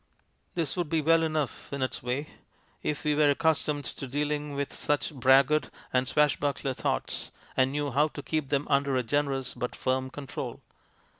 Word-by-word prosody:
" - - -42
This 165 -5 0
would 175 -4 -1
be 160 - +2
well 165 +2 +4
enough 155 -5 -2
in 140 -1 -1
its 130 - -2
way, 130 +5 -2 0.5
if 150 - -2
we 150 - +2
were 150 0 +4
accustomed 150 -1 +1
to 135 - -5
dealing 145 +1 -1
with 140 0 -2
such 145 +1 0
braggart 135 +3 +4 0.2
and 125 0 +2
swashbuckler 145 -2 +1
thoughts - - -2 0.3
and 130 0 +3
knew 145 0 -1
how 145 +4 +4
to 145 -2 -8
keep 155 -3 -1
them 145 0 +1
under 140 -1 +2
a 130 - +2
generous 135 +1 0
but 125 0 -4
firm 130 0 0
control. 140 0 -6
145 Hz, 175 wpm, -29 LUFS, 135-150 Hz, 0.5 s, well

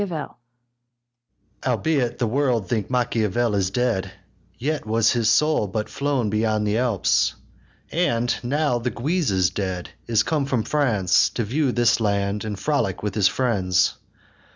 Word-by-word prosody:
Albeit 125 +1 0
the 120 - 0
world 120 -4 0
think 105 -1 -2
Machiavel 120 -2 0
is 95 -2 +1
dead, 100 -4 -1 0.5
Yet 150 +3 -2
was 110 +1 +2
his 115 -3 +1
soul 150 -5 +3
but 105 +3 -3
flown 140 -7 -1
beyond 110 0 0
the 105 +2 +1
Alps; 100 - +1 0.6
And, 120 -8 +1
now 135 0 0
the 120 +1 -2
Guise 155 +7 -1
is 95 -2 +2
dead, 95 -3 -4 0.2
is 115 -2 +2
come 150 -4 -1
from 125 -5 0
France, 105 -10 +2
To 115 - -3
view 135 +5 0
this 120 -1 +2
land, 100 -1 0
and 105 -2 -4
frolic 115 - -1
with 105 -2 -2
his 100 -2 +3
friends. 100 -9 +1
115 Hz, 145 wpm, -23 LUFS, 100-130 Hz, 0.6 s, soul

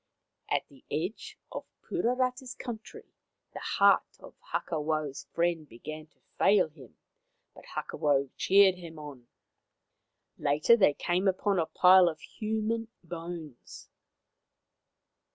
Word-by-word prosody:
At - - +1
the 135 -2 -20
edge 180 +8 -4
of - - -6 0.2
Puarata's 255 -4 -1
country 225 -2 -8 0.5
the - - -6
heart - - +3
of - - -13 0.2
Hakawau' 155 -2 -1
s 135 - -9
friend 170 -3 0
began 155 +7 -8
to - - -38 0.2
fail 195 -5 +5
him, 140 -6 -16 0.6
but - - -15
Hakawau 140 -2 0
cheered 195 -1 +5
him 165 -2 -10
on. 145 -5 -10 1.1
Later 150 +10 +4
they 190 -10 +4
came 180 +3 0
upon 195 0 +1
a 160 - 0
pile 180 -1 +6
of 160 - -7
human 220 +1 -3 0.2
bones. 165 -5 -8
170 Hz, 115 wpm, -29 LUFS, 150-205 Hz, 1.1 s, pile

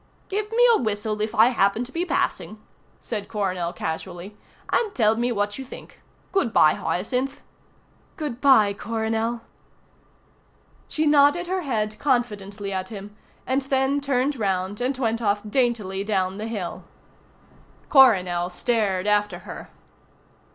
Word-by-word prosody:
"Give 420 +2 -2
me 485 +2 +5
a - - +3
whistle 215 -1 -2
if 215 +2 -2
I 225 +3 +6
happen 215 -1 +2
to 250 - -9
be 340 +4 -1
passing," 215 -10 -2 0.4
said 210 -4 -5
Coronel 185 -5 -2
casually, 175 +4 -6 0.4
"and 440 -4 +1
tell 220 -2 +3
me 240 +2 0
what 205 0 -2
you - - -4
think. 260 - -12 0.3
Good 275 - +1
bye, 155 - +5
Hyacinth." 250 +11 -2 0.8
"Good 290 -7 -5
bye, 220 -8 +5
Coronel." 225 +2 -2 1.5
She 315 - -1
nodded 295 +3 +4
her 370 +1 -2
head 215 -7 -2
confidently 205 -7 -1
at 185 0 -3
him, 205 -1 -9 0.3
and 265 +2 +1
then 270 +1 0
turned 275 0 0
round 195 0 -1
and 255 +2 -1
went 230 -2 -1
off 205 -2 +1
daintily 210 -5 0
down 190 -2 -1
the 215 - -4
hill. 205 -6 -5 1.0
Coronel 180 -10 +5
stared 195 -1 0
after 210 0 +1
her. - - -9
220 Hz, 135 wpm, -24 LUFS, 200-265 Hz, 1.5 s, I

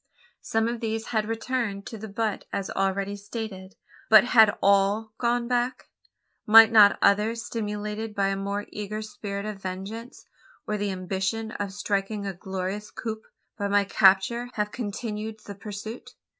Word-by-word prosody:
Some 225 0 0
of 235 0 -3
these 225 -1 -3
had 215 -2 0
returned 225 -3 -2
to 225 - -7
the 220 - -7
butte 215 0 -2
as 195 -1 -3
already 195 +1 -1
stated, 200 -2 -7 0.3
but 215 -1 +9
had 225 -4 +5
all 200 +2 +2
gone 240 0 +1
back? 245 +1 -1 0.6
Might 225 +1 +9
not 210 -2 +7
others 215 +3 +3
stimulated 210 0 -4
by 195 -2 +1
a 195 - 0
more 200 +1 -3
eager 210 +1 -5
spirit 200 -1 -6
of 210 -2 -6
vengeance, 195 +6 -7 0.4
or 210 - -2
the 205 -1 -1
ambition 190 +4 -2
of 200 -3 -4
striking 200 +1 -2
a 195 - -3
glorious 190 +3 -5
coup 220 -2 -5 0.4
by 200 - 0
my 200 0 +3
capture 200 +5 +3
have 210 -1 -1
continued 215 -1 -5
the 200 - -7
pursuit? 210 +3 -8
210 Hz, 155 wpm, -26 LUFS, 200-225 Hz, 0.6 s, but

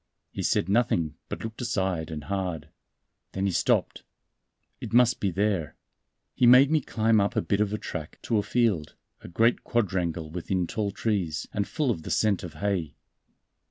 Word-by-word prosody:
He - - -5
said - - +1
nothing, 95 -7 +1 0.2
but - - -5
looked 115 +2 -6
aside 95 -8 -1
and 75 -2 -6
hard. 90 0 -3 0.6
Then 95 +1 -1
he 100 - +1
stopped. - - +1 0.8
"It - - -7
must 125 0 +4
be 100 - 0
there." 95 -6 -1 0.6
He 125 - +3
made 130 +4 +7
me 155 -1 +3
climb 110 -3 +2
up 100 - -1
a - - +2
bit 100 +1 0
of 105 -1 +1
a 105 - -1
track - - -7
to 110 - +1
a - - +2
field, 105 -9 0 0.2
a - - -11
great 115 +7 +2
quadrangle 85 -8 -1
within 90 +1 -1
tall 105 +3 -2
trees, 95 -7 -2
and 100 -1 -1
full 150 -5 0
of 85 - -3
the - - -8
scent 105 -3 +2
of 85 -4 -8
hay. 95 -7 -2
100 Hz, 180 wpm, -27 LUFS, 85-110 Hz, 0.8 s, made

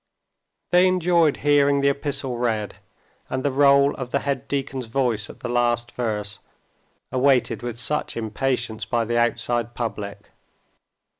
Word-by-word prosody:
They 180 +1 +6
enjoyed 175 -4 +3
hearing 145 -1 +4
the 140 - +4
epistle 140 -2 -2
read, 110 -4 -1 0.5
and 130 +1 -3
the 145 - +2
roll 140 +1 +5
of 130 -2 -6
the 140 +1 0
head 140 -1 -2
deacon's 135 -3 -3
voice 115 -4 -1
at - - -12
the - - -4
last 120 -1 0
verse, 105 -4 -3 0.7
awaited 130 -1 +2
with 120 -1 -5
such 150 0 -1
impatience 115 0 -2
by 115 -1 0
the 120 +1 0
outside 120 0 0
public. 105 -4 -5
125 Hz, 140 wpm, -23 LUFS, 120-140 Hz, 0.7 s, They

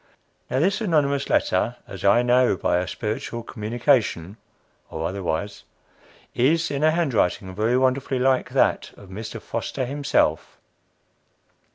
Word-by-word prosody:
Now, 130 - 0
this 195 - +1
anonymous 145 -8 +1
letter, 110 +6 +1
as 95 -2 -9
I 100 +5 +4
know 125 -4 +3
by 90 - +1
a 90 - -3
spiritual 115 +1 -4
communication, 115 - 0 0.5
(or 80 +1 -3
otherwise,) 95 +1 -4 0.7
is 160 +7 +2
in 140 +1 -2
a 155 - +6
handwriting 125 - 0
very 110 +5 +1
wonderfully 130 +1 +1
like 130 0 +1
that - - +1
of 100 - -14
Mr. 110 +4 -7
Foster 120 +4 -4
himself. 135 - 0
120 Hz, 130 wpm, -23 LUFS, 100-140 Hz, 0.7 s, a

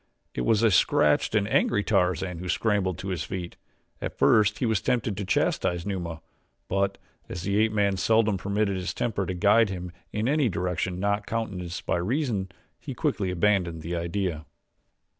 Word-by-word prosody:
It - - -3
was 110 - +2
a 115 - +5
scratched 95 - +3
and 100 -1 +2
angry 105 -1 +2
Tarzan 90 -3 0
who 90 +1 -6
scrambled 100 -5 +1
to 95 - -5
his 90 -4 -2
feet. 90 +3 -5 0.5
At - - -5
first 105 -1 +4
he - - -1
was 110 -3 +1
tempted 120 -5 0
to 100 +1 -4
chastise 85 -2 0
Numa; 85 -5 -4 0.5
but, 100 +1 0 0.3
as 90 - -5
the 100 +2 +1
ape 110 0 +3
man 100 -2 +1
seldom 110 +2 +3
permitted 100 +1 -1
his 90 +1 -4
temper 100 -5 -1
to 90 - -2
guide 105 +4 +4
him 90 -2 -5 0.2
in 105 +2 -1
any 145 -2 +2
direction 90 0 -2
not 100 +1 0
countenanced 100 -7 -4
by - - +1
reason, 105 - -1 0.3
he - - -7
quickly 95 -3 -1
abandoned 90 -3 +1
the 85 +2 -3
idea. 85 -2 -2
100 Hz, 175 wpm, -26 LUFS, 90-105 Hz, 0.5 s, a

